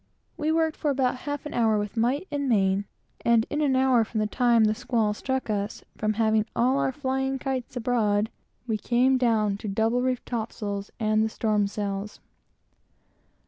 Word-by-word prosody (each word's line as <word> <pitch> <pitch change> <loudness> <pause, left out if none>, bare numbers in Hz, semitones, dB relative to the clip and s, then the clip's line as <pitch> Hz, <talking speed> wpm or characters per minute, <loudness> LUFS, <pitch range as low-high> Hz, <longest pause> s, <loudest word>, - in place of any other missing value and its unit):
We 310 -1 -1
worked 320 -1 +1
for 300 - -1
about 260 -2 +1
half 290 0 -4
an 300 - -6
hour 220 -2 +2
with 205 +1 -3
might 255 +10 0
and 285 -2 -1
main; 195 -2 +2 0.4
and 230 -1 +4
in 295 - 0
an 275 -3 +2
hour 260 -3 +4
from 220 0 -4
the 215 - +1
time 235 +1 +3
the 215 0 +3
squall 230 -2 0
struck 260 +4 -3
us, 205 -1 -3
from 215 0 0
having 220 -1 +2
all 255 +3 +2
our 265 - +1
flying 265 -1 -1
kites 260 -2 -4
abroad, 220 -3 +1 0.3
we 225 -3 -1
came 255 +4 +2
down 215 -5 +2
to 210 - -7
double 225 +4 +1
reefed 255 -1 -1
top 230 -2 -3
sails 200 -1 -4
and 215 -1 +2
the 220 - 0
storm 210 -2 +1
sails. 200 0 -4
230 Hz, 185 wpm, -26 LUFS, 215-260 Hz, 0.4 s, and